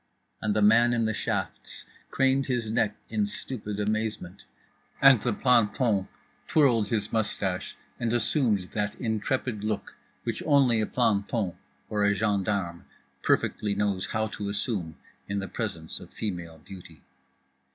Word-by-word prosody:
And 105 Hz, -1 st, 0 dB
the 105 Hz, -, +3 dB
man 115 Hz, +3 st, +6 dB
in 115 Hz, -1 st, +1 dB
the 110 Hz, -, 0 dB
shafts -, -, -3 dB, 0.2 s
craned 135 Hz, 0 st, +2 dB
his 120 Hz, -4 st, -1 dB
neck 105 Hz, -2 st, +1 dB
in 210 Hz, -1 st, 0 dB
stupid 105 Hz, -, -5 dB
amazement, 105 Hz, -3 st, -2 dB, 0.5 s
and 135 Hz, -5 st, +7 dB
the 120 Hz, -, 0 dB
planton 115 Hz, -3 st, +2 dB, 0.4 s
twirled 120 Hz, -9 st, +4 dB
his 105 Hz, -1 st, -2 dB
moustache 100 Hz, -4 st, -1 dB, 0.2 s
and 115 Hz, -2 st, 0 dB
assumed 115 Hz, -, +1 dB
that 105 Hz, -1 st, -2 dB
intrepid 115 Hz, -1 st, -2 dB
look 105 Hz, -2 st, -3 dB, 0.3 s
which -, -, -3 dB
only 135 Hz, -6 st, +4 dB
a 110 Hz, -, 0 dB
planton 105 Hz, -4 st, 0 dB, 0.3 s
(or 105 Hz, -1 st, 0 dB
a 100 Hz, 0 st, +3 dB
gendarme) 100 Hz, -4 st, -1 dB, 0.4 s
perfectly 105 Hz, -1 st, +1 dB
knows 100 Hz, -2 st, 0 dB
how 110 Hz, 0 st, 0 dB
to 105 Hz, -2 st, -5 dB
assume 100 Hz, -6 st, -2 dB, 0.3 s
in 100 Hz, -, -2 dB
the 100 Hz, -1 st, -2 dB
presence 85 Hz, -8 st, -4 dB
of -, -, -12 dB
female 85 Hz, -6 st, -5 dB
beauty. 80 Hz, -2 st, -13 dB
105 Hz, 140 wpm, -27 LUFS, 100-120 Hz, 0.5 s, and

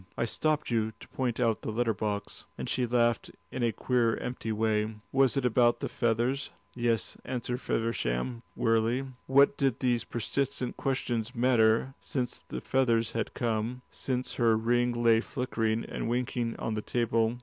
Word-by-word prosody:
I -, -, +1 dB
stopped 150 Hz, +4 st, 0 dB
you 110 Hz, -1 st, +1 dB
to -, -, -12 dB
point 125 Hz, -3 st, -2 dB
out 115 Hz, -3 st, +2 dB
the -, -, -4 dB
letter 115 Hz, +1 st, +1 dB
box," 105 Hz, 0 st, -3 dB
and -, -, -4 dB
she 125 Hz, -1 st, 0 dB
laughed 120 Hz, -1 st, +2 dB, 0.2 s
in 130 Hz, -, -4 dB
a 120 Hz, -1 st, +3 dB
queer 120 Hz, -1 st, +1 dB
empty 125 Hz, -2 st, -4 dB
way. 110 Hz, 0 st, 0 dB, 0.2 s
"Was 135 Hz, -1 st, +3 dB
it 135 Hz, -, +1 dB
about 120 Hz, 0 st, +4 dB
the -, -, -2 dB
feathers?" 120 Hz, +4 st, 0 dB, 0.2 s
"Yes," 115 Hz, -4 st, 0 dB
answered 125 Hz, 0 st, -3 dB
Feversham, 115 Hz, -, -1 dB
wearily. 115 Hz, +3 st, +2 dB, 0.2 s
What 140 Hz, +1 st, +5 dB
did 135 Hz, -4 st, +1 dB
these 120 Hz, -2 st, +1 dB
persistent 125 Hz, +2 st, -2 dB
questions 125 Hz, -3 st, -2 dB
matter, 120 Hz, 0 st, +3 dB
since 125 Hz, -3 st, -2 dB
the -, -, -7 dB
feathers 115 Hz, -4 st, +2 dB
had 115 Hz, -1 st, -3 dB
come, 120 Hz, +1 st, -1 dB
since 130 Hz, -1 st, -2 dB
her 115 Hz, -2 st, +5 dB
ring 120 Hz, +2 st, +2 dB
lay 115 Hz, -1 st, +6 dB
flickering 115 Hz, -4 st, -1 dB
and -, -, -4 dB
winking 120 Hz, -1 st, -1 dB
on 115 Hz, -, -2 dB
the 105 Hz, -, -2 dB
table? 115 Hz, 0 st, +1 dB
120 Hz, 160 wpm, -29 LUFS, 115-125 Hz, 0.2 s, lay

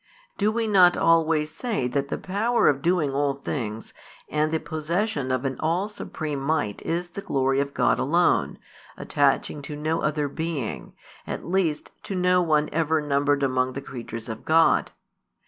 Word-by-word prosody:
Do 210 Hz, +1 st, +1 dB
we 230 Hz, +1 st, -1 dB
not 185 Hz, -4 st, +5 dB
always 160 Hz, -2 st, +3 dB
say 200 Hz, -, -2 dB
that 140 Hz, +2 st, -1 dB
the -, -, -3 dB
power 220 Hz, +6 st, 0 dB
|266 -, -, +7 dB
of 135 Hz, -, -13 dB
doing 165 Hz, -5 st, +1 dB
all 140 Hz, 0 st, +1 dB
things 115 Hz, -6 st, -5 dB, 0.4 s
and 155 Hz, +1 st, 0 dB
the 160 Hz, -, +1 dB
possession 160 Hz, -, -2 dB
of 130 Hz, +1 st, -1 dB
an 135 Hz, -1 st, -2 dB
all 170 Hz, +5 st, 0 dB
supreme 155 Hz, -8 st, -5 dB
might 140 Hz, -7 st, -1 dB
is 175 Hz, +2 st, -2 dB
the 200 Hz, -, -7 dB
glory 135 Hz, -7 st, +1 dB
of 140 Hz, 0 st, -2 dB
God -, -, +2 dB
alone, -, -, +2 dB, 0.4 s
attaching 145 Hz, +1 st, 0 dB
to 145 Hz, +1 st, -7 dB
no 155 Hz, +2 st, -1 dB
other 150 Hz, -1 st, 0 dB
being, 155 Hz, -4 st, -4 dB, 0.3 s
at -, -, -5 dB
least 170 Hz, -4 st, -1 dB
to 195 Hz, -, -5 dB
no 180 Hz, 0 st, +3 dB
one 155 Hz, -3 st, +2 dB
ever 160 Hz, 0 st, +1 dB
numbered 145 Hz, -1 st, +1 dB
among 130 Hz, -1 st, +1 dB
the 140 Hz, -, -4 dB
creatures 115 Hz, -4 st, -7 dB
of 110 Hz, -2 st, -6 dB
God? 160 Hz, +1 st, +4 dB
150 Hz, 170 wpm, -25 LUFS, 140-170 Hz, 0.4 s, |266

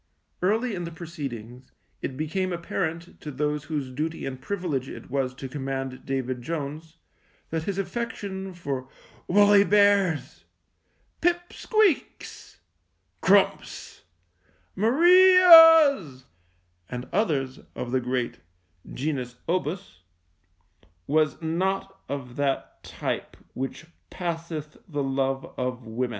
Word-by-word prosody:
Early 220 Hz, +6 st, +1 dB
in 175 Hz, -3 st, -4 dB
the 170 Hz, -, -6 dB
proceedings 130 Hz, -8 st, -8 dB, 0.3 s
it 130 Hz, -, -4 dB
became 185 Hz, +5 st, -2 dB
apparent 170 Hz, -1 st, -4 dB
to 150 Hz, -, -6 dB
those 150 Hz, +1 st, -2 dB
whose 145 Hz, -5 st, -3 dB
duty 155 Hz, +5 st, -3 dB
and 130 Hz, -1 st, -6 dB
privilege 165 Hz, -10 st, -3 dB
it -, -, -10 dB
was 130 Hz, -2 st, -1 dB
to 135 Hz, -, -7 dB
command 135 Hz, -1 st, -5 dB
David 130 Hz, -2 st, -2 dB
Jones 155 Hz, +3 st, -5 dB, 0.5 s
that 160 Hz, 0 st, -2 dB
his 200 Hz, -1 st, -3 dB
affection 195 Hz, -2 st, -4 dB
for 135 Hz, -6 st, -4 dB, 0.4 s
woolly 205 Hz, +1 st, +6 dB
bears, 200 Hz, -5 st, +2 dB, 0.8 s
pip 350 Hz, +1 st, 0 dB
squeaks, 430 Hz, -, -1 dB, 0.6 s
crumps, 195 Hz, 0 st, +1 dB, 0.7 s
Marias, 325 Hz, -, +7 dB, 0.6 s
and 125 Hz, 0 st, -6 dB
others 145 Hz, -11 st, 0 dB, 0.2 s
of 120 Hz, -, -5 dB
the 130 Hz, 0 st, +1 dB
great 125 Hz, -1 st, -2 dB, 0.5 s
genus 130 Hz, -3 st, -3 dB
obus 170 Hz, -, -3 dB, 1.1 s
was 155 Hz, 0 st, +1 dB
not 190 Hz, +4 st, -2 dB
of 130 Hz, -3 st, -6 dB
that 140 Hz, -1 st, -2 dB
type -, -, -4 dB, 0.2 s
which 135 Hz, +5 st, -5 dB, 0.2 s
passeth 165 Hz, -4 st, -5 dB
the 145 Hz, -3 st, -2 dB
love 135 Hz, 0 st, -2 dB
of 125 Hz, -1 st, -3 dB
women. 120 Hz, +3 st, -2 dB
155 Hz, 110 wpm, -26 LUFS, 135-195 Hz, 1.1 s, Marias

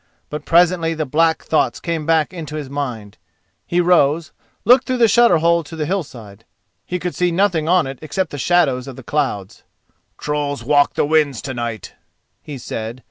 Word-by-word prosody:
But 150 Hz, 0 st, -6 dB
presently 170 Hz, -1 st, +3 dB
the 155 Hz, -1 st, -2 dB
black 160 Hz, +3 st, +1 dB
thoughts 145 Hz, -6 st, 0 dB
came 165 Hz, -3 st, -3 dB
back 160 Hz, +1 st, +2 dB
into 155 Hz, -4 st, -7 dB
his 145 Hz, -3 st, -6 dB
mind. 120 Hz, -8 st, -5 dB, 0.5 s
He 175 Hz, -, 0 dB
rose, 165 Hz, -3 st, +2 dB, 0.3 s
looked 250 Hz, +2 st, +5 dB
through 255 Hz, -1 st, 0 dB
the 235 Hz, -2 st, +5 dB
shutter 230 Hz, -4 st, +5 dB
hole 170 Hz, +1 st, +2 dB
to 155 Hz, -, -10 dB
the 155 Hz, -1 st, -2 dB
hillside. 120 Hz, -, -5 dB, 0.4 s
He 180 Hz, -, -2 dB
could 180 Hz, 0 st, -4 dB
see 180 Hz, 0 st, +1 dB
nothing 170 Hz, -3 st, +1 dB
on 180 Hz, -3 st, +4 dB
it 135 Hz, -1 st, -7 dB
except 160 Hz, +3 st, -3 dB
the 145 Hz, -, -6 dB
shadows 140 Hz, -5 st, +1 dB
of 135 Hz, -, -8 dB
the 130 Hz, -, -11 dB
clouds. 115 Hz, -10 st, -3 dB, 0.6 s
"Trolls 145 Hz, -3 st, -3 dB
walk 145 Hz, +2 st, +3 dB
the -, -, +1 dB
winds 150 Hz, -5 st, +2 dB
to 130 Hz, -, -4 dB
night," 120 Hz, -4 st, -5 dB, 0.5 s
he 145 Hz, -2 st, -8 dB
said. 115 Hz, 0 st, -6 dB
155 Hz, 185 wpm, -19 LUFS, 135-170 Hz, 0.6 s, looked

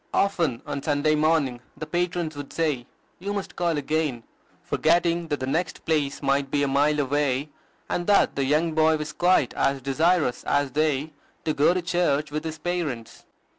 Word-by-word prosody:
Often 170 Hz, -11 st, +1 dB
on 140 Hz, -, -4 dB
Sunday 145 Hz, +1 st, +1 dB
morning 155 Hz, -5 st, +2 dB, 0.2 s
the 155 Hz, -, -5 dB
patrons 175 Hz, -1 st, -2 dB
would 145 Hz, -1 st, -7 dB
say, 150 Hz, -7 st, -1 dB, 0.3 s
"You 200 Hz, +3 st, -3 dB
must 200 Hz, -2 st, -5 dB
call 170 Hz, -3 st, 0 dB
again," 145 Hz, -4 st, -1 dB, 0.4 s
forgetting 170 Hz, +1 st, +1 dB
that 145 Hz, -2 st, -2 dB
the 130 Hz, -, -2 dB
next 160 Hz, +4 st, -2 dB
place 150 Hz, -3 st, 0 dB
might 140 Hz, 0 st, +1 dB
be 145 Hz, 0 st, +1 dB
a -, -, +2 dB
mile 145 Hz, +2 st, +2 dB
away, 145 Hz, 0 st, 0 dB, 0.4 s
and 175 Hz, -, -2 dB
that 205 Hz, -, +4 dB
the 140 Hz, -, 0 dB
young 155 Hz, +5 st, +2 dB
boy 160 Hz, 0 st, +3 dB
was 150 Hz, 0 st, -5 dB
quite 175 Hz, -6 st, +3 dB
as 135 Hz, 0 st, +1 dB
desirous 145 Hz, +1 st, +1 dB
as 140 Hz, -1 st, +1 dB
they, 150 Hz, +1 st, 0 dB, 0.3 s
to 155 Hz, -, +1 dB
go 150 Hz, +5 st, +3 dB
to 180 Hz, -, -1 dB
church 155 Hz, -4 st, 0 dB
with 155 Hz, +2 st, -3 dB
his 160 Hz, -1 st, -4 dB
parents. 155 Hz, -9 st, -4 dB
155 Hz, 175 wpm, -25 LUFS, 140-165 Hz, 0.4 s, that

